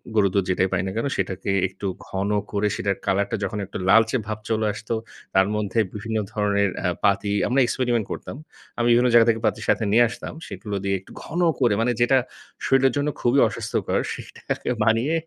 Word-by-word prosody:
গরুর 100 -3 +3
দুধ, 100 - +2
যেটাই 95 0 +2
পাই 95 - +1
না - - -3
কেন? 115 - -1
সেটাকে 95 0 -3 0.2
একটু - - -10 0.2
ঘন 95 +1 -2 0.2
করে 105 0 +1
সেটার 100 -1 -1
কালারটা 100 +3 +1
যখন 105 0 -2
একটু 100 - -7
লালচে 110 +4 +5
ভাব 110 -1 -3
চলে 110 -1 +1
আসতো, 105 +2 -5 0.4
তার 95 0 +4
মধ্যে 105 +1 -1
বিভিন্ন 110 +2 -3
ধরনের 100 -1 +1 0.2
আ - - +3 0.2
পাতি 100 0 +2 0.2
আমরা 130 +3 +2
এক্সপেরিমেন্ট 120 -2 0
করতাম। - - -6 0.4
আমি 120 0 +1
বিভিন্ন 120 +1 +4
জায়গা 115 -1 +7
থেকে 115 -1 +1
পাতি - - -1
সাথে - - +2
নিয়ে 120 +3 +6
আসতাম। - - -7
সেগুলো 105 -2 -6
দিয়ে 100 0 +1
একটু 95 - -18
ঘন 170 - -4 0.2
করে 120 -5 +3
মানে 125 +2 +2
যেটা 125 +2 +5 0.5
শরীরের 135 -1 +3
জন্য 145 +1 0
খুবই 125 +3 +3
অস্বাস্থ্যকর, 115 -1 -2
সেটাকে - - -5
বানিয়ে 115 +7 +2
110 Hz, 190 wpm, -23 LUFS, 100-120 Hz, 0.5 s, জায়গা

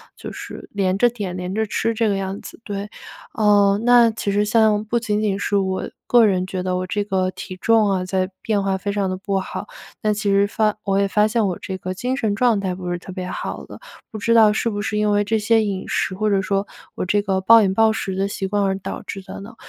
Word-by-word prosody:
就 - - -8
是 - - -9
连 190 -2 0
着 240 +4 +4
点、 200 -6 -5
连 180 +1 -4
着 220 +1 0
吃 225 +3 -1
这 225 0 +1
个 200 - +1
样 195 0 -3
子， - - -11
对。 205 -1 -5 0.4
呃， 205 -2 +4
那 240 -1 +6
其 210 -2 -3
实 205 +1 +2
像 215 -1 +3
不 235 +3 0
仅 210 -2 -1
仅 200 -2 0
是 205 - 0
我 190 -1 -1 0.2
个 240 -2 +6
人 185 -2 +1
觉 185 -1 -4
得 185 0 -1
我 185 - -2
这 205 +3 -1
个 185 -2 0
体 185 0 -8
重 225 -2 +3
啊 185 -2 0
在 185 0 -1
变 210 -2 0
化， 195 -1 0
非 200 +1 -3
常 200 -2 -1
地 185 - -3
不 195 0 -1
好， 190 - -6 0.4
那 210 0 +2
其 205 -1 -2
实 200 0 +4
发 210 +1 0
我 195 -1 +1
也 200 - +2
发 210 +2 +3
现 215 -1 +1
我 180 - -2
这 190 - -5
个 185 +1 -4
精 250 +6 -2
神 215 -6 -1
状 230 -3 +2
态 185 -2 -2
不 180 -1 -5
是 175 - -1
特 185 - -10
别 185 -1 -5
好 - - -5
的， - - -11 0.3
不 215 - -6
知 230 +3 +1
道 215 -2 +6
是 230 - 0
不 205 -2 -4
是 210 0 -3
因 210 0 +2
为 205 0 +3
这 220 +2 0
些 220 +1 +3
饮 195 -2 -3
食， 185 - -1
或 215 +3 0
者 200 - +2
说 195 +1 -1 0.3
我 - - -3
这 205 +3 +2
个 190 -1 0
暴 230 +4 +7
饮 190 -1 +1
暴 220 +1 +4
食 195 -3 -3
的 195 +1 0
习 200 -1 -4
惯 205 +1 0
而 190 0 0
导 - - -6
致 195 -1 -6
的 190 - -9
呢？ 225 +4 -11
200 Hz, 280 characters per minute, -21 LUFS, 190-215 Hz, 0.4 s, 暴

